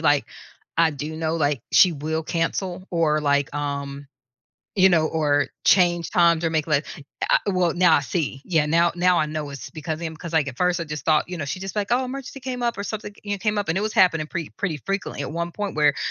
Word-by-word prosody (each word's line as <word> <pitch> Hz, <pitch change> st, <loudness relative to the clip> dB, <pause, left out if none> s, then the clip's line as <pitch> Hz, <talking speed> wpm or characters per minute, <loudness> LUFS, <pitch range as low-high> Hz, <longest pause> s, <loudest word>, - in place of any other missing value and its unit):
like -, -, +3 dB, 0.5 s
I 165 Hz, -1 st, +5 dB
do 150 Hz, +2 st, -6 dB
know, 160 Hz, 0 st, -1 dB
like 145 Hz, -4 st, +1 dB
she 180 Hz, -3 st, +6 dB
will 160 Hz, +2 st, -3 dB
cancel 175 Hz, +3 st, -2 dB
or 155 Hz, -3 st, +2 dB
like, 145 Hz, -1 st, +1 dB
um, 140 Hz, -1 st, -4 dB, 0.7 s
you 190 Hz, -1 st, +6 dB
know, 160 Hz, -3 st, +3 dB
or 145 Hz, -3 st, +1 dB, 0.2 s
change 175 Hz, -3 st, +4 dB
times 170 Hz, -1 st, +4 dB
or -, -, +2 dB
make 160 Hz, -1 st, -1 dB
like 150 Hz, -1 st, +1 dB, 0.4 s
uh -, -, +6 dB
well, 180 Hz, -4 st, +2 dB
now 175 Hz, -2 st, +5 dB
I -, -, +3 dB
see. 145 Hz, -3 st, -3 dB
Yeah, 160 Hz, -4 st, +2 dB
now 170 Hz, +2 st, +3 dB
now 180 Hz, 0 st, +3 dB
I 155 Hz, -, +2 dB
know 150 Hz, -1 st, -4 dB
it's 140 Hz, -2 st, -8 dB
because 155 Hz, -1 st, -4 dB
of 165 Hz, -, -11 dB
him 160 Hz, -1 st, -4 dB
because, 165 Hz, +1 st, -8 dB
like, 160 Hz, -3 st, +2 dB
at 135 Hz, -, -5 dB
first 180 Hz, 0 st, +1 dB
I 170 Hz, -, -3 dB
just 150 Hz, -1 st, -6 dB
thought, 155 Hz, -1 st, +3 dB
you 180 Hz, -1 st, -5 dB
know, 150 Hz, -, -3 dB
she 145 Hz, +6 st, -4 dB
just 195 Hz, +1 st, -6 dB
like, 205 Hz, -1 st, -1 dB
"Oh, 255 Hz, +2 st, +2 dB
emergency 270 Hz, +1 st, -7 dB
came 250 Hz, -1 st, -4 dB
up 235 Hz, -4 st, 0 dB
or 200 Hz, -, -3 dB
something," 205 Hz, 0 st, -5 dB
you 205 Hz, -, -2 dB
kn -, -, -19 dB
came 210 Hz, +1 st, 0 dB
up 205 Hz, -3 st, -1 dB
and 165 Hz, -, 0 dB
it 200 Hz, -, 0 dB
was 215 Hz, -, -1 dB
happening 160 Hz, -4 st, +3 dB
pretty 165 Hz, -1 st, -5 dB
pretty 175 Hz, -7 st, -2 dB
frequently 195 Hz, 0 st, -3 dB
at -, -, -5 dB
one 170 Hz, +1 st, -3 dB
point 205 Hz, 0 st, -4 dB
where 150 Hz, -2 st, +3 dB
165 Hz, 245 wpm, -23 LUFS, 150-185 Hz, 0.7 s, she